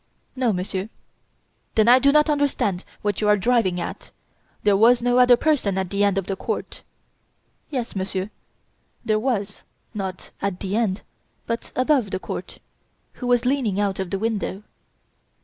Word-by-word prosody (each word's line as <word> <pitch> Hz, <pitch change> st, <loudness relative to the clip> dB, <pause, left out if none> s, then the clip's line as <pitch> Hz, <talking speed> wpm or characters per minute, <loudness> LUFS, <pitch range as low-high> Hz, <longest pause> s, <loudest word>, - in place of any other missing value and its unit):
"No, 255 Hz, -3 st, +1 dB
Monsieur!" 190 Hz, +1 st, -3 dB, 0.9 s
"Then 220 Hz, 0 st, +4 dB
I 250 Hz, +2 st, +8 dB
do 280 Hz, +2 st, +4 dB
not 300 Hz, +1 st, +4 dB
understand 285 Hz, -, 0 dB, 0.2 s
what 205 Hz, -1 st, -1 dB
you 210 Hz, -, +1 dB
are 210 Hz, 0 st, +5 dB
driving 200 Hz, -4 st, +2 dB
at. 170 Hz, -, -6 dB, 0.5 s
There 205 Hz, -1 st, +4 dB
was 235 Hz, +4 st, +5 dB
no 245 Hz, 0 st, +3 dB
other 245 Hz, -1 st, +7 dB
person 250 Hz, -10 st, +1 dB
at 190 Hz, -2 st, -2 dB
the 200 Hz, 0 st, +1 dB
end 200 Hz, -1 st, +2 dB
of 195 Hz, -, 0 dB
the 195 Hz, -, -2 dB
court." -, -, -4 dB, 0.9 s
"Yes, 250 Hz, -7 st, -4 dB
Monsieur, 190 Hz, +1 st, -3 dB, 0.7 s
there 215 Hz, -1 st, +2 dB
was, 210 Hz, -5 st, -2 dB, 0.3 s
not 190 Hz, -3 st, -5 dB
at 195 Hz, -2 st, -2 dB
the 195 Hz, 0 st, -3 dB
end, 215 Hz, -4 st, 0 dB, 0.4 s
but 230 Hz, 0 st, -4 dB
above 255 Hz, -4 st, +2 dB
the -, -, -2 dB
court, -, -, -6 dB, 0.6 s
who 250 Hz, -, -2 dB
was 245 Hz, 0 st, +3 dB
leaning 250 Hz, -7 st, +1 dB
out 200 Hz, -2 st, 0 dB
of 190 Hz, -2 st, -3 dB
the 195 Hz, -, -1 dB
window." 210 Hz, -2 st, -2 dB
210 Hz, 165 wpm, -23 LUFS, 195-245 Hz, 0.9 s, I